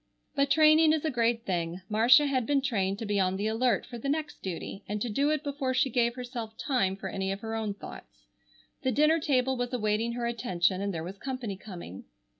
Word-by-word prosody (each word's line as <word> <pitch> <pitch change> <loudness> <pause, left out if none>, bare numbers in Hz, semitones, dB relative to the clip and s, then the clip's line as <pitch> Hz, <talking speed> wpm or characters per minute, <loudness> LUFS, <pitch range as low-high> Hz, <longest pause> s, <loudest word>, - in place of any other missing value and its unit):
But 280 -1 +1
training 310 +1 +6
is 315 0 -1
a 310 - +1
great 235 -1 +1
thing. 175 -1 -2
Marcia 235 +7 +6
had 260 -4 0
been 280 -2 +2
trained 200 -7 0
to 225 - -5
be 205 -1 0
on 185 0 +1
the 205 - -2
alert 225 -1 +1
for 240 -2 -8
the 275 - -3
next 305 +1 -2
duty 190 +2 -6
and 210 +1 -2
to 235 - -2
do 280 +7 +1
it 305 -1 0
before 275 -3 -2
she 265 0 +2
gave 235 0 +1
herself 240 -3 -6
time 195 -9 0
for 195 - -6
any 190 0 -2
of 195 +1 -4
her 225 -1 -5
own 220 -2 -2
thoughts. - - -12 0.6
The 260 - +1
dinner 305 +6 +4
table 265 -3 +1
was 245 +1 -3
awaiting 220 0 0
her 240 0 -3
attention, 190 -6 0
and 200 0 -1
there 165 -3 -4
was 190 +3 -8
company 255 -6 -4
coming. 180 - -9
235 Hz, 225 wpm, -29 LUFS, 200-270 Hz, 0.6 s, training